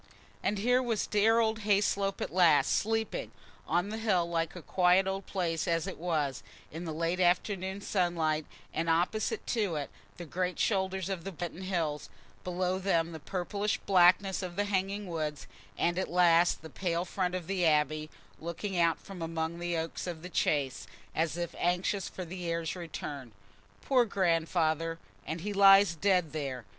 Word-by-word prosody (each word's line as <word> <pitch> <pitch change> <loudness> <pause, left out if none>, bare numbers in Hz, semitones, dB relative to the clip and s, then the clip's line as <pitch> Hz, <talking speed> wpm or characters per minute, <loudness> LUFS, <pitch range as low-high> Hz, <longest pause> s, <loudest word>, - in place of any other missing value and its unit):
And 205 +2 0
here 245 +5 +3
was 235 -4 -1
dear 215 +2 +3
old 220 -1 +2
Hayslope 200 -1 +1
at - - -3
last, 170 -5 +5
sleeping, 225 +1 -1 0.4
on 175 +4 +1
the 220 +1 -4
hill, 190 -6 +2
like 165 -1 -1
a 175 - -8
quiet 180 +1 +3
old 190 0 -3
place 170 -4 -1
as 165 -1 +1
it 190 - -6
was, 155 -6 -1 0.3
in 165 +3 -6
the 160 - -3
late 165 +3 -1
afternoon 190 +2 +1
sunlight, 165 -6 0 0.3
and 165 +1 -1
opposite 200 - 0
to 205 -8 0
it 145 -2 -4 0.3
the 175 - -7
great 180 +3 -2
shoulders 190 -3 0
of 190 -4 -3
the 195 - -5
Binton 175 +1 -6
Hills, 165 -6 -2 0.3
below 180 +1 -1
them 170 -4 +1
the 160 - -7
purplish 200 +5 -2
blackness 190 +1 +4
of 180 -2 -5
the 205 - 0
hanging 200 +1 -1
woods, 155 -4 -3 0.3
and 175 +1 +1
at 190 - -2
last 175 -1 +4
the 160 - -8
pale 175 -2 -1
front 180 -1 -1
of 180 -2 -4
the 190 0 -1
Abbey, 155 -1 +2 0.3
looking 175 +3 -3
out 170 -1 +3
from 195 -3 -10
among 165 0 -3
the 175 -1 -1
oaks 165 +2 -4
of 170 -2 -5
the 180 - -6
Chase, 135 - 0 0.3
as 165 +1 0
if 175 -1 -3
anxious 180 +3 0
for 185 - -6
the 180 +2 -7
heir's 165 0 -2
return. 145 -8 -7 0.5
"Poor 255 -3 +4
Grandfather! 165 -4 +1 0.3
And 160 +1 -3
he 205 +3 -3
lies 195 -1 +7
dead 180 -2 +1
there. 140 -5 -4
180 Hz, 170 wpm, -30 LUFS, 165-195 Hz, 0.5 s, lies